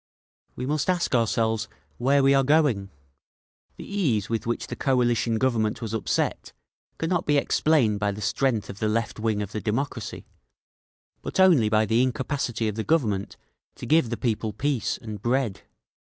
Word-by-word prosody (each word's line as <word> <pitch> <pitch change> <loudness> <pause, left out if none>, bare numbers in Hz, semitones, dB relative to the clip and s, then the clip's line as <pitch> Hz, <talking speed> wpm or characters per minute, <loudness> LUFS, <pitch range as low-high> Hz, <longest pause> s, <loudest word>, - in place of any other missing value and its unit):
"We 125 - -4
must 150 +4 -1
ask 180 -4 0
ourselves 115 -1 +1 0.3
where 135 +3 +3
we 135 0 +5
are 135 0 +4
going…. 135 -9 +2 0.9
The - - -8
ease 140 - 0
with 115 0 -2
which 120 - -2
the - - -6
Coalition 120 -3 +1
Government 110 -3 0
was 115 -2 -5
upset 110 - -1 0.4
cannot 170 +2 -1
be 145 -1 +3
explained 140 -7 +2
by 100 -1 0
the 100 - -7
strength 115 0 0
of 100 - -9
the 110 - 0
left 115 +1 -1
wing 110 -2 0
of 100 - -8
the 110 - -4
democracy, 125 +7 -3 1.0
but - - -5
only 165 -13 +5
by 110 0 +3
the 115 +3 +2
incapacity 130 -2 -1
of 105 - -1
the 110 - -1
Government 110 -12 0 0.4
to - - -8
give 155 -6 +3
the 120 - -3
people 110 -2 -1
peace 130 -1 -1
and 105 -3 -8
bread. 120 -3 0
115 Hz, 165 wpm, -25 LUFS, 110-140 Hz, 1.0 s, we